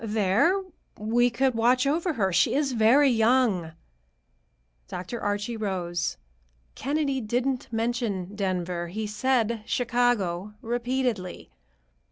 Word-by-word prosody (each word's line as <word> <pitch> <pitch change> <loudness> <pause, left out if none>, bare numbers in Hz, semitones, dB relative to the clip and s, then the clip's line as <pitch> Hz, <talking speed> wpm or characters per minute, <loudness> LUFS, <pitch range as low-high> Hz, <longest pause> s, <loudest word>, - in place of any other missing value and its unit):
There 220 - +2 0.3
we 235 +3 +2
could 265 +1 +1
watch 245 +3 +3
over 325 +5 +1
her. 195 -8 0
She 170 - +3
is 285 -1 +1
very 245 +5 +5
young." 225 -8 +2 1.1
Dr. 185 +7 -6
Archie 205 +3 -2
rose. 180 -5 -2 0.6
"Kennedy 280 0 -1
didn't 245 +3 -2
mention 225 -5 -2
Denver. 180 -3 -2
He 215 +5 -4
said 230 +1 0
Chicago, 220 -6 0
repeatedly. 240 - -2
230 Hz, 105 wpm, -26 LUFS, 200-255 Hz, 1.1 s, very